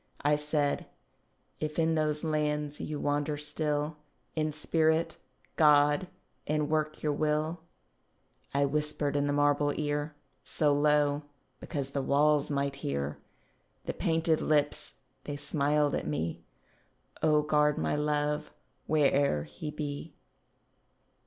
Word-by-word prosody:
I 145 +1 +4
said, 150 -1 -1 0.7
"If 155 0 -3
in 165 0 +2
those 155 -1 0
lands 150 -1 -1
you 150 -1 -4
wander 145 +1 0
still, 150 0 -1 0.4
In 155 -1 0
spirit, 160 +1 +1 0.4
God, 150 +3 +5 0.4
and 150 0 0
work 155 -1 -1
your 150 -1 +1
will," 155 +3 0 0.9
I 140 0 +2
whispered 150 0 0
in 145 0 +1
the - - +1
marble 145 0 +2
ear 150 0 -2 0.3
So 150 -2 +2
low—because 145 -1 -1
the 140 - -1
walls 145 +2 +3
might 140 -1 -1
hear— 70 - -3 0.7
The - - -2
painted 160 -1 +1
lips 145 -1 0 0.3
they 145 -1 -4
smiled 145 0 +1
at - - -2
me— 80 +3 -2 0.8
"O 150 -1 +4
guard 150 -1 +2
my - - 0
love, 150 0 0 0.4
where'er 140 - +3
he 75 - -7
be." 150 0 -5
150 Hz, 120 wpm, -30 LUFS, 145-155 Hz, 0.9 s, God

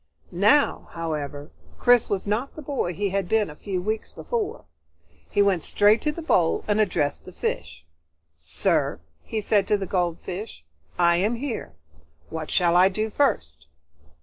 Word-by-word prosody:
Now, 210 +11 +3
however, 150 -3 -4 0.3
Chris 245 -2 +4
was 195 -2 -1
not 215 +7 -2
the 310 - -7
boy 270 -11 -2
he 200 +3 -1
had 195 -1 -2
been 215 -6 +2
a - - -12
few 190 +2 -3
weeks 215 +4 -3
before. 455 -1 -4 0.6
He 205 - +3
went 190 -5 +2
straight 210 +2 +4
to 300 - 0
the 330 +2 -7
bowl 175 - +2
and 210 0 +2
addressed 145 -8 0
the - - -10
fish. 75 - -4 0.5
"Sir," 80 - 0 0.2
he 220 - -4
said 200 -1 +2
to 210 - +3
the 195 - -4
goldfish, 180 - -3 0.3
"I 170 -1 +4
am 210 +6 +1
here. 235 - -5 0.6
What 160 -1 -5
shall 175 -2 +3
I 185 +2 +6
do 215 +3 -2
first?" 80 - 0
200 Hz, 160 wpm, -25 LUFS, 170-220 Hz, 0.6 s, I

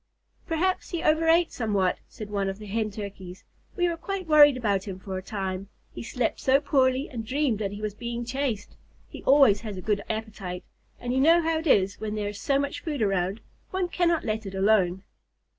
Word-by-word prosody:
"Perhaps 360 +3 0
he 340 -2 -3
overate 325 +1 +3
somewhat," 200 -6 0
said 210 -1 -9
one 200 -1 0
of 195 - -5
the 215 - -10
Hen 215 +1 -1
Turkeys. 195 -3 -8 0.3
"We 355 -1 +2
were 340 -1 -2
quite 390 +2 -4
worried 295 -3 +7
about 200 -5 0
him 190 -2 -5
for 190 0 -6
a 185 - -3
time. 190 -1 -4 0.2
He - - -7
slept 240 0 -2
so 270 +1 +4
poorly 265 -1 +2
and 235 -6 -6
dreamed 255 -1 0
that 200 -2 -2
he 205 +1 -7
was 210 -1 -2
being 235 +2 -5
chased. 245 -5 -3 0.3
He - - -10
always 270 -7 +6
has 215 -4 -6
a - - -4
good 210 -2 0
appetite, 215 -5 -5 0.4
and 245 0 -3
you 260 - +2
know 330 +5 +5
how 325 0 +1
it 325 - -4
is 200 -5 +3
when 215 -1 -3
there 205 -1 -2
is 205 -1 -8
so 275 - +2
much 280 0 -2
food 295 -7 -2
around. 195 +1 0 0.3
One 370 -1 -1
cannot 345 -2 +1
let 220 -1 -2
it 195 - -7
alone." 190 -2 +2
220 Hz, 210 wpm, -26 LUFS, 200-290 Hz, 0.4 s, worried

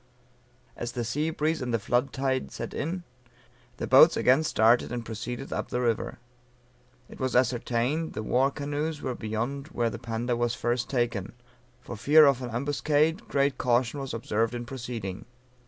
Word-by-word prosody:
As 120 0 -5
the 120 - -2
sea 145 +8 -1
breeze 160 -1 -1
and 125 -1 -2
the 115 - +2
flood 120 +5 0
tide 130 -1 -1
set - - -6
in, 175 +4 -3 0.7
the - - -3
boats - - +7
again 130 +5 +4
started 115 -5 +3
and 120 -1 -4
proceeded 120 +4 -5
up - - -3
the 125 - -2
river. 115 -3 -1 0.9
It - - -13
was 130 -1 -1
ascertained 125 +5 +1
the 110 - -4
war 130 +5 +2
canoes 145 +2 -3
were 130 - -1
beyond 120 +6 -3
where 120 -8 -1
the 120 - -6
Panda 120 +1 -2
was 120 0 0
first 120 0 -1
taken; 120 -6 -1 0.5
for - - -7
fear 150 +8 +6
of 135 -2 +3
an 125 - -4
ambuscade 145 - 0
great 140 -1 +1
caution 125 +2 +1
was 135 -1 -5
observed 115 +1 -1
in 120 0 -5
proceeding. 120 -6 -6
125 Hz, 170 wpm, -27 LUFS, 115-140 Hz, 0.9 s, boats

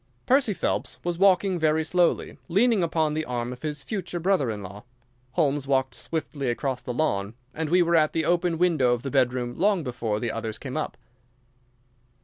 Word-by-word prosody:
Percy 260 -4 +3
Phelps - - -2
was 175 -1 -2
walking 190 -1 +4
very 160 0 +2
slowly, 175 +2 +1
leaning 210 +4 +3
upon 160 -2 +1
the 155 +1 -1
arm 125 -2 -3
of 125 - -12
his 150 -2 -3
future 180 -5 -4
brother 175 -7 +1
in 105 -2 -4
law. 100 +2 -9 0.5
Holmes 145 -4 +1
walked 130 -1 +1
swiftly 145 -4 -3
across 130 +1 -2
the - - -5
lawn, 110 -6 -1 0.2
and 160 -1 -3
we 180 +2 +5
were 170 0 +2
at 155 -2 +4
the 160 -1 -1
open 175 0 +1
window 155 -8 +3
of 120 - -3
the 135 - -4
bedroom 125 -2 +1
long 200 -3 +2
before 120 -5 -2
the 115 0 -2
others 110 -1 -4
came 130 -1 -7
up. 155 - -3
155 Hz, 185 wpm, -26 LUFS, 125-175 Hz, 0.5 s, we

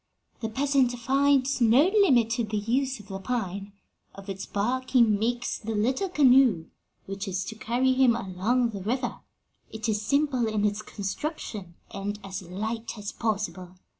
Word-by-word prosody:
'The 225 - -3
peasant 270 +1 +2
finds 270 +2 +2
no 235 +5 +6 0.2
limit 240 - +4
to 235 +1 0
the 215 -1 -2
use 255 +5 0
of 210 - -14
the 195 0 -5
pine. 200 -3 -3 0.4
Of 195 0 -11
its 195 0 -5
bark 250 +6 -1
he 250 -3 +5
makes 230 +3 0
the 225 0 -4
little 260 - 0
canoe 260 - +4 0.4
which 195 +1 -5
is 185 0 -2
to 220 - -6
carry 245 +4 +1
him 255 -2 +4
along 230 +4 0
the 200 -2 -6
river; 245 +7 -2 0.5
it 220 +1 -5
is 210 -1 0
simple 265 0 +1
in 215 -1 0
its 210 0 0
construction, 205 - -5 0.2
and 200 +1 -4
as 195 0 -6
light 220 +6 -5
as 205 0 -5
possible. 190 -5 -3
225 Hz, 165 wpm, -27 LUFS, 200-255 Hz, 0.5 s, no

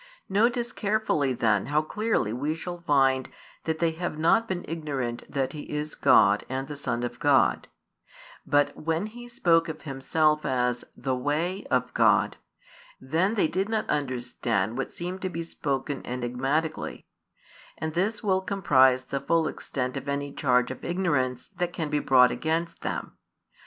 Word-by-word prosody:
Notice 235 +4 +2
carefully 200 - +1
then 110 -5 +1
how 150 +2 +2
clearly 210 - 0
we 145 +6 -1
shall 175 +1 -6
find 135 -4 +2 0.4
that 160 -1 -1
they 165 0 +1
have 165 -1 -4
not 195 +9 +3
been 180 -3 -3
ignorant 140 -7 -3
that 135 -2 -1
He 150 - -8
is 150 +1 -3
God 100 +1 +5
and 135 +1 -3
the 150 - -6
Son 120 -4 -2
of 120 0 -4
God; 145 -1 +3 0.8
but 145 -1 +2
when 165 +4 -1
He 240 +3 -9
spoke 170 -9 +2
of 155 - -7
Himself 150 +2 +1
as 125 -1 0
"the 130 0 -1
Way" 160 +9 -1
of 125 0 0
God, - - +3 0.6
then 165 +11 0
they 200 - +3
did 190 +5 -1
not 220 -1 -1
understand 125 -6 -1
what 135 - -3
seemed 180 +2 -5
to 185 - -2
be 170 -1 -4
spoken 140 -3 -3
enigmatically: 130 +6 -2 0.7
and 155 0 -3
this 205 +6 -1
will 190 -2 +2
comprise 135 -10 +3
the 140 +2 -3
full 165 -1 +2
extent 130 -4 -4
of 135 +1 -5
any 140 0 -2
charge 125 -2 +2
of 130 - -8
ignorance 145 -9 -1
that 175 -1 -1
can 155 -3 -3
be 150 - +2
brought 125 -3 +5
against 165 +1 -2
them. - - -4
150 Hz, 160 wpm, -27 LUFS, 130-175 Hz, 0.8 s, God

